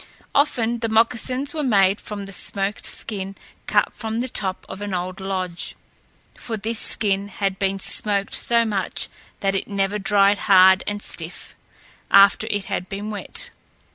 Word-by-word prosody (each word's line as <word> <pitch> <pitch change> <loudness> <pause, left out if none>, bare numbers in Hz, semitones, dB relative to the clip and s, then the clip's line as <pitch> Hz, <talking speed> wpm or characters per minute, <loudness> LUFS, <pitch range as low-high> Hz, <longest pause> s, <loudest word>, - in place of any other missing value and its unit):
Often 240 -5 +2
the 230 -1 -2
moccasins 250 +5 +1
were 310 - -2
made 200 -6 +3
from 205 -1 -6
the 195 - -9
smoked 195 +1 -3
skin 195 -2 -4 0.3
cut - - +2
from 225 0 -4
the 250 - -1
top 190 -5 0
of 190 - -8
an 205 -2 -3
old 180 +1 -4
lodge, 185 -2 -3 0.6
for 225 -2 -5
this 225 +2 -3
skin 200 -2 0
had 195 -1 -2
been 195 -1 0
smoked 200 +1 0
so 235 -1 +4
much 200 -4 -1 0.3
that 195 -1 +1
it 195 - -2
never 200 0 -1
dried 200 0 +3
hard 190 -1 +7
and 205 0 -3
stiff, 165 +2 -7 0.6
after 200 0 +6
it 205 -1 -1
had 180 - -4
been 205 +1 -5
wet. 480 - -3
200 Hz, 160 wpm, -22 LUFS, 195-220 Hz, 0.6 s, hard